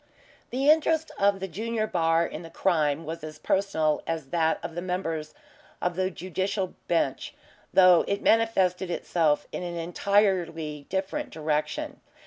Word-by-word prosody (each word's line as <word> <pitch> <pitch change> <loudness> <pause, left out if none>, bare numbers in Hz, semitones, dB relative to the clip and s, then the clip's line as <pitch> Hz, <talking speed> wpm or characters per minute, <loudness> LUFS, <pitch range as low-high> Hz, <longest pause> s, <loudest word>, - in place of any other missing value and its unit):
The 265 +3 -1
interest 315 0 +3
of 200 0 +3
the 190 - -3
junior 220 +4 -2
bar 165 -4 +2
in 160 - -6
the 165 - -10
crime 160 -4 +1
was 160 +1 -6
as 155 0 -7
personal 160 -6 +1
as 160 -4 -3
that 160 -2 +2
of 165 - -5
the 175 - -4
members 165 -4 -3 0.4
of 180 -1 -1
the 185 +1 0
Judicial 190 +2 -3
Bench, 165 -6 0 0.4
though 180 -2 +6
it 200 - -1
manifested 190 -5 +2
itself 160 -3 +1
in - - -4
an 175 -1 -4
entirely 170 -4 0
different 195 +11 -2
direction. 155 -1 -2
175 Hz, 145 wpm, -27 LUFS, 160-195 Hz, 0.4 s, though